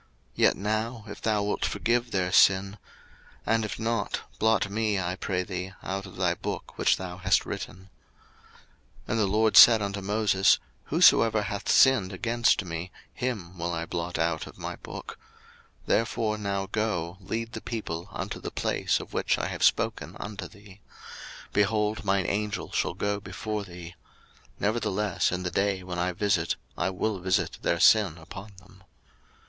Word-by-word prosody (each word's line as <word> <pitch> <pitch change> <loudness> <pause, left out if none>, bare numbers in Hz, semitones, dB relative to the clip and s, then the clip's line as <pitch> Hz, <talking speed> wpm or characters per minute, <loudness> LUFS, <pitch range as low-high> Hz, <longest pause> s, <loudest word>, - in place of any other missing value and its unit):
02:032:032 - - -34 0.3
Yet - - +4
now, 110 +3 -2
if 105 - -9
thou 105 -2 +1
wilt 105 - -2
forgive 120 +1 0
their 90 -4 -1
sin; 100 +2 +4 0.7
and 115 0 +2
if 105 - -4
not, 115 -2 -1 0.2
blot 110 -1 +3
me, 105 -1 0
I 90 0 -2
pray 90 -1 -2
thee, 95 0 -5
out 95 +1 -4
of 95 - -12
thy 90 -2 +1
book - - -6
which - - +3
thou 90 -1 -6
hast 95 - +2
written. 95 0 -7 1.2
02:032:033 - - -14
And 115 - +1
the 105 - +3
LORD 110 +2 +2
said 115 -2 +10
unto 100 -1 -3
Moses, 100 -1 +3 0.3
Whosoever 110 -2 +5
hath 100 +1 -4
sinned 125 -8 +5
against 115 +1 +1
me, 85 +1 -5 0.2
him 105 -9 -4
will 85 +1 -2
I 85 -1 -3
blot 85 0 -3
out 80 -1 -1
of - - -13
my - - -5
book. - - -9 0.6
02:032:034 - - -29
Therefore 110 -1 0
now 100 -1 -2
go, 95 -5 -1
lead 115 +4 -4
the - - -5
people 85 -8 -5
unto - - -5
the - - -5
place - - 0
of - - -10
which - - +1
I - - -2
have - - -6
spoken - - +1
unto 105 -1 -6
thee: 100 -2 -16 0.7
behold, 105 +1 +1
mine 95 -2 +1
Angel 105 0 -2
shall - - -1
go 100 +1 -1
before 105 +2 -4
thee: 90 -2 -10 0.7
nevertheless 105 -3 0
in 90 0 -2
the 90 - -2
day 95 -1 0
when 90 -1 -5
I 90 +1 0
visit 90 -3 0 0.2
I 90 - 0
will 95 +2 -2
visit 90 +1 0
their 85 - 0
sin 100 -3 +5
upon 95 +6 -10
them. 95 0 -18
100 Hz, 170 wpm, -27 LUFS, 90-110 Hz, 1.2 s, said